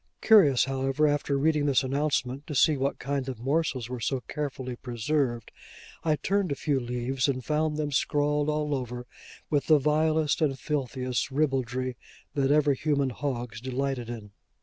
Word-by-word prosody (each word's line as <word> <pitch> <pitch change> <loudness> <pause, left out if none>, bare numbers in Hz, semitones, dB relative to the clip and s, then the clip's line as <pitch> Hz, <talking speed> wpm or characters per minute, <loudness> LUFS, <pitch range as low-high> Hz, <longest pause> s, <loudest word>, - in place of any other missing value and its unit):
Curious, 170 - +6
however, 135 +2 0
after 145 -1 0
reading 150 0 +2
this 135 -1 +3
announcement, 140 0 -1
to 150 - -5
see 150 +3 +5
what 135 +1 -1
kind 135 -1 -3
of 130 - -5
morsels 135 -2 0
were 125 0 -5
so 130 +2 -1
carefully 135 -3 -5
preserved, 120 0 -2 0.5
I 155 -2 +2
turned 190 +3 0
a - - 0
few 140 0 0
leaves, 125 +2 -1
and 130 -3 -2
found 150 0 0
them 150 -1 -2
scrawled 145 +1 +1
all 150 -1 0
over 125 -2 -4 0.5
with 145 -3 +1
the 155 - +7
vilest 155 +1 +1
and 150 -3 +3
the - - -11
filthiest 130 -3 -2
ribaldry 130 -3 -1 0.4
that 135 -2 +1
ever 150 -1 +4
human 140 -1 0
hogs 120 -4 -4
delighted 130 -1 -2
in. 110 -4 -7
140 Hz, 165 wpm, -27 LUFS, 130-150 Hz, 0.5 s, the